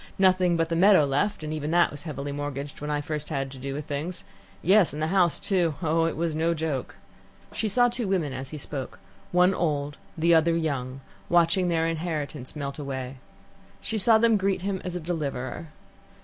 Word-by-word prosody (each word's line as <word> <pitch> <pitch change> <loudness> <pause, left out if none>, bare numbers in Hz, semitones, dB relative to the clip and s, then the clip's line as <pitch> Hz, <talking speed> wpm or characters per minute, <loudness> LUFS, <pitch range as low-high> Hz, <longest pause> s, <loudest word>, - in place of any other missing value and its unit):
Nothing 185 -2 +4
but 165 0 0
the 165 - 0
meadow 185 -3 +6
left, 150 +7 0
and 155 0 -3
even 150 -1 -3
that 175 +1 +4
was 145 - -7
heavily 145 -3 -5
mortgaged 145 -1 -5
when 150 - -4
I 145 0 0
first 150 0 -4
had 135 -3 -2
to 135 - -10
do 135 +1 -4
with 150 0 -5
things 155 +4 -4 0.4
yes, 190 -2 +4
and 150 - -5
the 155 +1 0
house 180 -4 +3
too. 180 -6 +1
Oh, 165 +1 +2
it 165 - -1
was 165 -1 -1
no 165 +2 +1
joke." 155 -5 -3 0.6
She 220 - -1
saw 245 +4 +4
two 240 -2 -2
women 170 -8 0
as 130 0 -6
he 155 - -7
spoke, 140 -2 -6 0.3
one 180 +2 +4
old, 145 -5 -1 0.2
the 170 +1 +4
other 165 +1 +4
young, 135 -5 -2 0.3
watching 175 +2 +3
their 165 -2 +1
inheritance 155 -5 -4
melt 140 -1 -5
away. 135 -2 -5 0.6
She 220 -1 -2
saw 220 +3 +6
them 225 -1 +4
greet 190 -2 0
him 195 -1 -2
as 180 -1 -5
a - - -2
deliverer. 155 -3 -4
160 Hz, 200 wpm, -26 LUFS, 145-180 Hz, 0.6 s, meadow